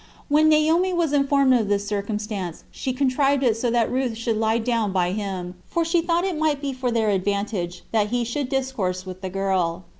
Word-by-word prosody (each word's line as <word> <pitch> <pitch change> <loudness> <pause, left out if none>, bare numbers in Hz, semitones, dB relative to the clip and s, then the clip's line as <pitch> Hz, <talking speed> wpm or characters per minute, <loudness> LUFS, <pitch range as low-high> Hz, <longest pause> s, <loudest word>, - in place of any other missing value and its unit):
When 305 +2 +5
Naomi 320 +4 +3
was 335 -4 0
informed 275 -2 +3
of 230 -4 +2
this 200 0 0
circumstance 205 -3 -4
she 260 - -3
contrived 275 +1 +1
it 235 -4 +3
so 235 +2 -1
that 235 -1 +1
Ruth 255 -3 -1
should 230 0 -1
lie 220 +1 +2
down 230 -3 0
by 180 -2 +1
him, 190 -3 -4
for 335 -1 0
she 335 +1 +2
thought 340 +2 +1
it 360 -5 -2
might 310 -2 +1
be 280 -1 -3
for 255 -1 -2
their 225 -2 +1
advantage 195 -2 -2
that 215 -2 +2
he 240 +2 0
should 250 +3 -3
discourse 230 -10 -2
with 185 0 -8
the 190 - -4
girl. 185 -2 -1
230 Hz, 205 wpm, -23 LUFS, 200-275 Hz, -, When